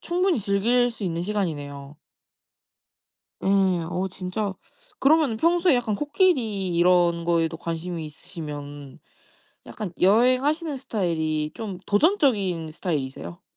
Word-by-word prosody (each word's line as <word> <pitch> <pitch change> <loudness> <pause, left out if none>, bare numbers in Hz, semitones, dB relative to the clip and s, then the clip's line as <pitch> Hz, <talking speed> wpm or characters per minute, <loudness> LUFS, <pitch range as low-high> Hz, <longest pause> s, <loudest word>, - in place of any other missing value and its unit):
충분히 360 -2 +1
즐길 230 +5 +2
수 230 -3 -7
있는 170 -1 -2
시간이네요. 145 -8 -4 1.5
예. - - +1
어 185 -1 +1
진짜 190 +2 -3 0.5
그러면은 285 -5 +3
평소에 340 +2 +3
약간 230 -4 0
코끼리 235 - +1
이런 175 -1 +3
거에도 165 -1 +1
관심이 170 0 -4
있으시면 145 -3 -8 0.7
약간 205 -5 -6
여행하시는 255 - +3
스타일이 160 - -2
좀 205 -5 -6
도전적인 205 - +2
스타일이세요? 135 - -4
190 Hz, 280 characters per minute, -24 LUFS, 165-245 Hz, 1.5 s, 그러면은